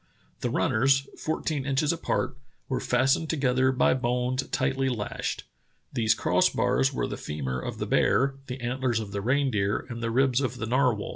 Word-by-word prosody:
"The - - -1
runners, 135 +4 +2
fourteen 155 -2 -2
inches 140 +3 +1
apart, 160 -5 -1 0.3
were 130 - -1
fastened 135 +4 +1
together 130 -3 +2
by 130 - +3
bones 125 +1 0
tightly 135 0 0
lashed. 110 -5 -3 0.5
These 110 -1 +2
cross - - +3
bars 65 +1 +1
were - - -1
the - - -5
femur 65 -4 -4
of - - -5
the - - -3
bear, 135 +1 +2
the 125 0 -5
antlers 120 -1 0
of 105 -3 -6
the 100 0 -3
reindeer, 115 -5 +1
and 115 -1 -6
the 115 - -1
ribs 130 +2 +2
of 130 -2 -2
the 110 - -3
narwhal. 125 -3 +1
130 Hz, 170 wpm, -27 LUFS, 115-135 Hz, 0.5 s, by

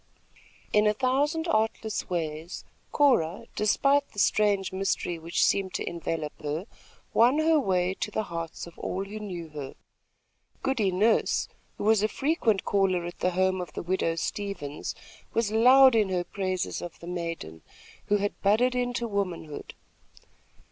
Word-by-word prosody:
In 210 0 +5
a 210 - +2
thousand 290 +7 +1
artless 220 -4 -1
ways, 165 -1 -4 0.3
Cora, 215 - +2
despite 280 +7 +2
the - - -18
strange 200 -1 +2
mystery 190 -3 -1
which 165 +2 +1
seemed 190 -2 0
to - - -3
envelop 165 -3 -3
her, 150 +4 -3 0.5
won 245 +5 +5
her 315 0 +4
way 185 -6 +1
to - - -2
the 215 +1 -2
hearts 165 -4 -5
of 170 - -14
all 190 +2 -3
who 210 +2 -7
knew 180 -6 -6
her. 145 -3 -7 0.9
Goody 230 -8 +1
Nurse, 210 +5 +2 0.3
who - - -5
was 215 0 +4
a 215 - +3
frequent 235 -6 0
caller 190 -3 +1
at 175 - -7
the 180 - +2
home 185 +1 +1
of 175 -4 -7
the - - -5
widow 175 -2 0
Stevens, 165 -5 -4 0.4
was 225 -2 +1
loud 255 +4 +7
in 215 -4 +3
her 180 -1 0
praises 185 0 -3
of 175 - -8
the - - -10
maiden, 165 - -5 0.5
who 205 - +3
had 205 0 -3
budded 225 +6 +3
into 245 -1 -1
womanhood. 180 -7 -4
195 Hz, 155 wpm, -27 LUFS, 175-225 Hz, 0.9 s, loud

